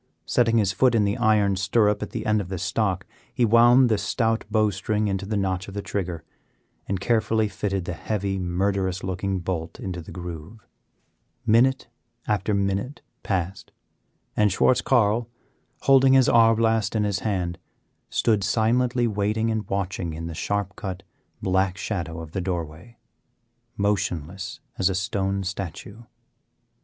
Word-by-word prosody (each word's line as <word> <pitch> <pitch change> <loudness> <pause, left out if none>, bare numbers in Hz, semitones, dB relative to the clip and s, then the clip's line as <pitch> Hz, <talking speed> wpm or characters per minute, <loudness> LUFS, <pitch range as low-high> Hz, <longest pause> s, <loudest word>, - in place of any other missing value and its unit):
Setting 115 -1 +2
his 100 -4 +2
foot 120 +5 +3
in 110 - +3
the 100 +1 0
iron 110 -4 +3
stirrup 105 +2 +2
at - - -4
the - - -5
end 105 0 +2
of 90 - -8
the 95 - -3
stock, 95 +1 -1 0.3
he 120 - +2
wound 120 +3 +6
the 110 -3 +1
stout 115 +3 0
bow 110 -1 +2
string 105 +3 -1
into 100 0 -2
the 105 0 -1
notch 95 -2 -1
of 100 - -9
the 100 - -2
trigger, 90 -5 -3 0.6
and 95 -1 -1
carefully 110 0 +1
fitted 100 -2 -3
the 90 - -3
heavy, 95 +4 -2
murderous 95 +1 -1
looking 95 +1 -2
bolt 85 -2 -4
into 90 -2 -5
the 80 - -11
groove. 90 +4 -8 0.8
Minute 125 +4 +3 0.4
after 105 -1 0
minute 100 +7 -2 0.2
passed, 95 -2 -3 0.6
and 105 -1 +3
Schwartz 125 +6 +3
Carl, 115 -2 +2 0.5
holding 135 -1 +5
his 130 -2 +5
arbelast 115 -1 +3
in 105 - +2
his 100 -1 0
hand, 90 -5 -2 0.5
stood 110 -4 +1
silently 120 +4 +2
waiting 110 +1 0
and 110 -3 -3
watching 95 -4 -2
in 80 +1 -6
the 85 - -5
sharp 100 +3 -2
cut, 95 -1 -6 0.4
black 95 0 +1
shadow 85 -5 -4
of 80 -2 -9
the 95 - -2
doorway, 90 +4 -5 0.8
motionless 95 -3 -2 0.2
as 95 - +3
a 95 - -1
stone 95 0 -1
statue. 95 +3 -6
100 Hz, 150 wpm, -24 LUFS, 95-110 Hz, 0.8 s, wound